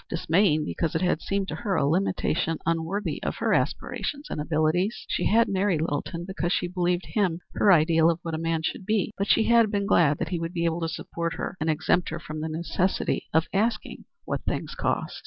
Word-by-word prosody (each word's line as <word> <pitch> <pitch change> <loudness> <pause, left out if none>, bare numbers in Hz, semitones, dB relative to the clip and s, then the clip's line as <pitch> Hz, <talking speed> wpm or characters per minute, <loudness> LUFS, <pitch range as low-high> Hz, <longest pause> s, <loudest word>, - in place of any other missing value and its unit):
Dismaying 165 -2 +2
because 165 +2 -2
it 160 - +1
had 180 -3 +1
seemed 195 -1 -1
to - - -3
her 205 -5 -1
a - - +2
limitation 165 0 0
unworthy 165 +5 -1
of - - -2
her - - 0
aspirations 285 0 -2
and 150 - -2
abilities. 160 +7 0
She - - 0
had 230 +2 +4
married 190 -3 +1
Littleton 165 +2 -3
because 175 -2 -2
she 180 - +1
believed 180 0 0
him 185 -6 0
her 205 - +4
ideal 165 -1 +5
of 165 - +1
what 165 - -4
a 160 - -2
man 165 -1 -1
should 175 - -3
be, 215 +1 0
but 200 - -2
she 220 - +4
had 230 -1 +4
been 200 -1 -1
glad 150 -6 +4
that 160 - -3
he 175 -2 -2
would 165 +1 -4
be 170 -2 -1
able 165 +1 0
to 165 - -1
support 170 +1 -4
her - - -4
and 160 - 0
exempt 175 +3 +1
her 160 - -4
from 155 -2 -7
the 160 - -3
necessity 170 +4 -1
of 160 0 +3
asking 220 +5 -1 0.2
what - - -2
things - - -3
cost. - - -2
170 Hz, 215 wpm, -26 LUFS, 160-195 Hz, 0.2 s, ideal